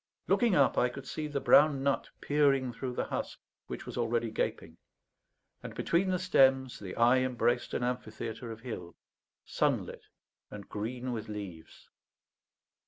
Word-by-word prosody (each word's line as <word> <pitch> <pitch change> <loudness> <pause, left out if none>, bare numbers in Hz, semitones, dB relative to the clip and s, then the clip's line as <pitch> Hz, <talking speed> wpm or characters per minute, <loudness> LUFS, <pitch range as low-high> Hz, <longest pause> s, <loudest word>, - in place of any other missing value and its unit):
Looking 235 -6 +3
up, 140 -2 +4
I 125 - +3
could 135 +2 -9
see 155 -1 -4
the 145 -1 -2
brown 145 -1 +5
nut 140 0 0
peering 135 -4 +2
through 125 +2 -4
the - - 0
husk, - - -4 0.3
which - - -6
was - - -5
already 115 -1 0
gaping; - - -3 0.8
and - - -8
between 180 +3 +1
the 185 - +1
stems 135 -8 +3
the 95 -3 -7
eye 120 +2 +5
embraced 120 -1 0
an - - -1
amphitheatre 115 -1 -4
of 110 0 -9
hill, 90 -9 -7 0.5
sunlit - - -1 0.4
and 105 -2 -9
green 120 +4 -4
with 110 -1 -5
leaves. 95 -6 -8
125 Hz, 150 wpm, -31 LUFS, 115-135 Hz, 0.8 s, brown